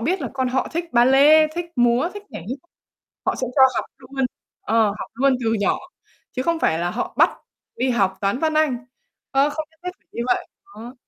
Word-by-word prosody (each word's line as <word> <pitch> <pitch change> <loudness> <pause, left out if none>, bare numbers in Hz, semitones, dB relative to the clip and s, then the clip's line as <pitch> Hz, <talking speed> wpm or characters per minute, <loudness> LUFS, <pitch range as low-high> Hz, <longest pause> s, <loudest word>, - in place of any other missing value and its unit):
biết 345 +10 0
là - - -3
con 260 -1 0
họ 260 +1 0
thích 335 +1 -1
ba 240 0 +5
lê, 290 +4 +6
thích 345 0 -2
múa, 240 +5 +3
thích 410 - -7
nhảy - - -7
hip 260 - -4 0.7
họ - - +1
sẽ 255 - -2
cho 270 - +5
học - - -1
luôn, 270 0 -3 0.4
ờ, 225 0 +3
học - - -6
luôn 270 +2 +3
từ 225 0 +1
nhỏ, 205 -3 +1 0.5
chứ 255 - -3
không 335 +4 0
phải 160 - +1
là 175 +1 -1
họ - - -3
bắt - - +6 0.5
đi 255 +2 +1
học 195 -6 +1
Toán, 200 +5 0
Văn, 315 0 +1
Anh, 310 -5 +2 0.5
ơ, 275 +2 +3
không 310 +1 -4
nhất 320 - -30
thiết 360 - -2
phải - - -41
như - - -4
vậy, - - 0 0.2
đó. 245 - -11
260 Hz, 220 wpm, -22 LUFS, 235-310 Hz, 0.7 s, lê